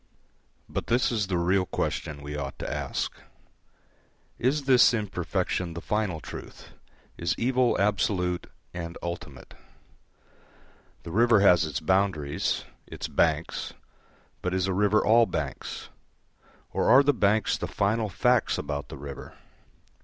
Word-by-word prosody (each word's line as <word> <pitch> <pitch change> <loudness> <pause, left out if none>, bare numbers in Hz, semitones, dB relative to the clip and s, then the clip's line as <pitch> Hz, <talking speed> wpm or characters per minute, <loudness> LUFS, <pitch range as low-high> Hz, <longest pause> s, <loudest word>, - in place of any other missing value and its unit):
But - - -4
this 120 +2 +2
is 105 -4 0
the 90 -2 0
real 90 +2 +2
question 70 -2 -3
we 75 +1 -6
ought 70 -2 -5
to - - -4
ask: - - -3 1.3
Is 140 +4 +1
this 125 -2 +6
imperfection 90 -4 -2
the - - -4
final 105 -4 -1
truth, - - -10 0.5
is 85 0 0
evil 125 0 +2
absolute 95 -3 0 0.3
and 85 -1 -6
ultimate? 85 -6 -7 1.5
The 85 - -7
river 115 +2 +4
has 90 -5 +5
its 75 -5 -3
boundaries, 95 -7 0 0.2
its - - -6
banks, - - 0 0.7
but 90 0 -1
is 95 -1 +1
a 95 - -1
river 105 +2 +3
all 115 +1 +5
banks? 75 -5 -5 0.8
or - - +1
are 135 +2 +8
the 145 +1 +3
banks 105 -2 +2
the - - -4
final 110 +2 0
facts 90 - +2
about 70 -1 -4
the - - -8
river? 70 0 -9
95 Hz, 130 wpm, -27 LUFS, 85-110 Hz, 1.5 s, are